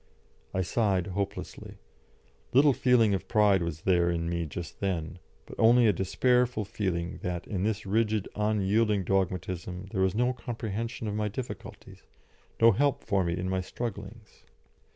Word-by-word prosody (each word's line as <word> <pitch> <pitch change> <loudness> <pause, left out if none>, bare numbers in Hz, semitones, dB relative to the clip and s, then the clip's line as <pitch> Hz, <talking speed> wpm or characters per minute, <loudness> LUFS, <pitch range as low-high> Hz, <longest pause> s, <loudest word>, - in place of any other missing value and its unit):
I 95 - -1
sighed 95 -2 +1
hopelessly. 100 +1 -5 0.8
Little 140 +2 +6
feeling 120 -5 +3
of 95 - -3
pride 105 -4 +4
was 85 -2 -4
there 85 -2 +2
in 85 -1 -1
me 85 -1 -2
just 85 +3 -7
then, 90 -3 -3 0.3
but - - -11
only 120 +2 +6
a 105 - +5
despairful 120 +5 +1
feeling 90 -4 -3
that 90 -1 -3
in 95 -4 -3
this 105 +1 -1
rigid, 110 0 +1
unyielding 105 0 +1
dogmatism 90 0 -2
there 95 -4 -1
was 95 0 +2
no 125 +3 +2
comprehension 115 -1 -5
of 105 - -2
my 105 0 -1
difficulties, 120 +5 -8 0.6
no 115 0 +7
help 140 +6 +1
for 100 -2 +1
me 85 0 -1
in 90 - -3
my 95 0 0
strugglings. 105 +1 -7
100 Hz, 150 wpm, -28 LUFS, 90-115 Hz, 0.8 s, no